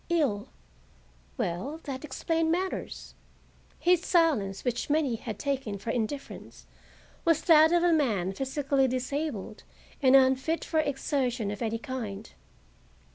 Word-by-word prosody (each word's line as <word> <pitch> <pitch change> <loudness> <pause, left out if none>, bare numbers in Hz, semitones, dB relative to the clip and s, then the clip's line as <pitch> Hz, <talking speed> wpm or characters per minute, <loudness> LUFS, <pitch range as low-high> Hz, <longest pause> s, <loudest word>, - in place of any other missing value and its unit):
Ill,—well, 250 - -4
that 270 -2 -6
explained 320 +3 -1
matters. 370 +3 -3 0.6
His 355 -1 +3
silence, 280 - +2
which 245 +2 -2
many 295 -4 +2
had 220 -2 -6
taken 265 -7 -2
for 210 +4 -4
indifference, 245 +5 -5 0.6
was 330 -3 +2
that 320 -1 +6
of 345 0 +3
a 350 -1 +4
man 210 - +1
physically 270 +2 0
disabled 255 -4 -3 0.4
and 265 -1 +6
unfit 265 +5 +3
for 320 - 0
exertion 270 -6 -1
of 205 - -7
any 230 -1 -1
kind. 225 -6 -6
270 Hz, 120 wpm, -28 LUFS, 225-315 Hz, 0.6 s, that